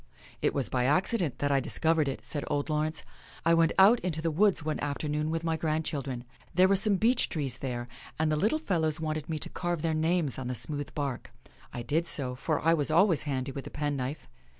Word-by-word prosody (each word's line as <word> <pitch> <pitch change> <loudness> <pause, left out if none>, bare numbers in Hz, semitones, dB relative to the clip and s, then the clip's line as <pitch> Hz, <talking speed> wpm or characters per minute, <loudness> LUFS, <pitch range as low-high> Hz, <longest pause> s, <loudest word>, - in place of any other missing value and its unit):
" - - -22
It - - +1
was 140 -3 +1
by 125 -1 0
accident 155 - +1
that 145 0 0
I 140 - +4
discovered 160 +3 +1
it," 135 - -4
said 145 - -3
old 145 +1 -1
Laurence. 155 +1 0 0.2
" - - -21
I 165 - +5
went 165 -1 +4
out 210 +5 +7
into 175 -3 -3
the 165 +1 -1
woods 185 -1 +2
one 155 - -1
afternoon 150 +1 -2
with 165 0 -2
my 165 -1 0
grandchildren. 150 -6 -2 0.3
There 185 +1 +6
were 195 - +4
some 200 +1 +3
beech 230 +6 +2
trees 145 -6 -2
there, 120 -2 -4 0.3
and 155 0 +1
the - - +2
little 215 - +2
fellows 165 - 0
wanted 155 -1 -3
me 160 - -1
to - - -5
carve 175 -3 -3
their 165 -1 +1
names 160 -3 +1
on 130 - -4
the 125 - -2
smooth 145 +5 -4
bark. 140 -4 -3 0.4
I 120 - -5
did 160 +8 0
so, 130 -5 +1
for 150 +4 -1
I 165 - +5
was 150 -3 0
always 170 +1 +4
handy 130 0 -2
with 135 0 -7
a - - -6
penknife. 145 -1 -3
155 Hz, 225 wpm, -29 LUFS, 140-165 Hz, 0.4 s, out